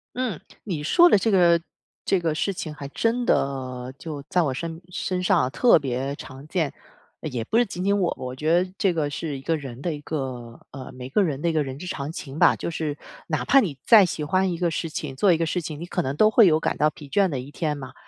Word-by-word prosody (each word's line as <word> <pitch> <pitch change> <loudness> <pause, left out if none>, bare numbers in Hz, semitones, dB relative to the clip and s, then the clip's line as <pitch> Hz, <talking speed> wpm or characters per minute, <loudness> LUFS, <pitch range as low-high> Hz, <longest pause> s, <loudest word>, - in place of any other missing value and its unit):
嗯， 245 -9 -2 0.2
你 170 -8 -4
说 345 - +6
的 - - +6
这 225 +3 +1
个 175 -3 +5 0.5
这 195 - +2
个 165 -3 -1
事 195 +5 -1
情 155 -4 -5
还 140 - -7
真 230 +9 0
的 130 - -1
就 155 -3 -6
在 180 - +2
我 140 -4 -1
身 165 +4 -5
身 180 0 -3
上 125 -7 +3
特 240 - +5
别 135 0 -3
常 135 +1 -11
见。 160 -3 -1 0.6
也 125 -2 -3
不 220 - 0
是 240 - +4
仅 185 -3 -5
仅 200 +1 +3
我， 175 - +1
我 125 0 -5
觉 155 +4 -1
得 185 - -3
这 190 -3 +2
个 155 -3 -1
是 145 0 -4
一 - - -10
个 165 +4 0
人 135 -4 -7
的 170 +2 -2
一 150 - -7
个 130 -6 -5
呃， 130 -2 -8
每 125 0 -8
个 200 +10 +2
人 145 -6 -2
的 170 - 0
一 - - -1
个 155 -2 +2
人 135 0 -7
之 180 - -7
常 140 -3 -4
情 140 -3 -8
吧。 - - +5
就 - - -4
是 155 -3 -3 0.3
哪 - - -1
怕 275 - +6
你 160 - -3
再 215 -4 +8
喜 155 -3 -3
欢 185 +4 +1
一 170 - -3
个 175 0 +1
事 165 +1 -3
情 150 -3 -5
做 185 +8 +4
一 170 - +3
个 165 - 0
事 180 +2 -1
情， 155 -2 -6
你 170 - -5
可 180 - -2
能 140 -2 -3
都 215 - +6
会 220 0 +6
有 155 -4 +4
感 - - -1
到 150 - +3
疲 150 -1 -12
倦 195 +6 +2
的 140 -5 -3
一 130 +3 -8
天 150 0 -2
嘛。 130 -2 -9
155 Hz, 280 characters per minute, -24 LUFS, 140-180 Hz, 0.6 s, 再